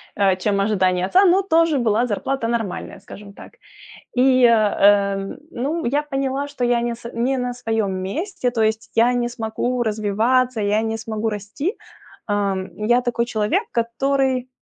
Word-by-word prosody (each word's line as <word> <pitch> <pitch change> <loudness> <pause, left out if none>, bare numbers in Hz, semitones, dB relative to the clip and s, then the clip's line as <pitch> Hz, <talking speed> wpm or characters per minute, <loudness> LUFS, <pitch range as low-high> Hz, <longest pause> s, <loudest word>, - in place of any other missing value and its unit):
э, 195 -2 +3
чем 200 +1 0
ожидание 185 -3 +1
отца, 380 - +4
но 380 +2 +4
тоже 330 -5 +3
была 235 0 +1
зарплата 245 +3 -2
нормальная, 225 -4 -3
скажем 200 0 -12
так. - - -13 0.6
И, 255 0 +4
э, 205 -3 +4 0.3
ну, 295 +5 -3
я 285 +5 +1
поняла, 275 -1 -2
что 285 -3 -8
я 240 -1 +2
не 235 0 -1
с 235 0 -9
не 255 +3 0
на 250 -1 -2
своем 225 -5 -1
месте. 250 - -3
То 235 -2 -3
есть 220 +1 -1
я 235 +2 +4
не 240 -1 0
смогу 240 +1 -2
развиваться, 225 +3 +1
я 210 +1 +1
не 225 0 -2
смогу 220 0 -3
расти. 210 - -4 0.5
А, 205 -2 0 0.2
я 240 +4 +2
такой 240 -1 -1
человек, 225 - 0
который 255 +2 0
235 Hz, 160 wpm, -21 LUFS, 210-260 Hz, 0.6 s, отца